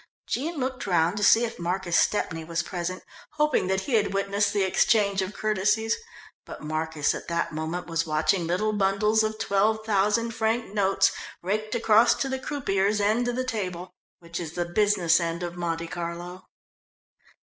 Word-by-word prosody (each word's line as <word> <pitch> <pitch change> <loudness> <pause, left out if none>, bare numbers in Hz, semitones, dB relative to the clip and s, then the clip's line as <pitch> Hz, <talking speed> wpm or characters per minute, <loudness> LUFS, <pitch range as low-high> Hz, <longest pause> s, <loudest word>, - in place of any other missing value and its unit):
Jean 315 +6 -2
looked 260 -4 -3
round 170 0 +2
to 205 - -2
see 225 +3 +6
if 230 - -7
Marcus 175 0 -1
Stepney 165 -6 +1
was 165 0 -2
present, 180 0 -4 0.3
hoping 300 -10 +1
that 190 0 0
he 260 - -5
had 205 -3 +2
witnessed 200 +1 +1
the 200 - +1
exchange 200 +1 +2
of 190 +1 -3
courtesies, 215 +2 +1 0.5
but - - -10
Marcus 155 -1 -1
at - - -7
that 170 0 -1
moment 160 +3 -3
was 165 0 -2
watching 160 +3 +1
little 210 +5 0
bundles 210 +2 +2
of 215 0 -1
twelve 215 +2 +1
thousand 210 +2 +1
franc 225 -1 -1
notes 195 -2 +3 0.3
raked 215 +3 -2
across 225 0 +5
to 275 - -2
the 265 0 -3
croupier's 210 -8 0
end 215 +4 +1
of 245 - -1
the 255 - -1
table 185 -7 -4 0.2
which 170 0 -7
is 165 -2 -6
the 175 0 -2
business 180 -2 +3
end 170 0 -3
of 175 0 -5
Monte 170 -1 -2
Carlo. 175 +2 -6
195 Hz, 170 wpm, -26 LUFS, 175-220 Hz, 0.5 s, see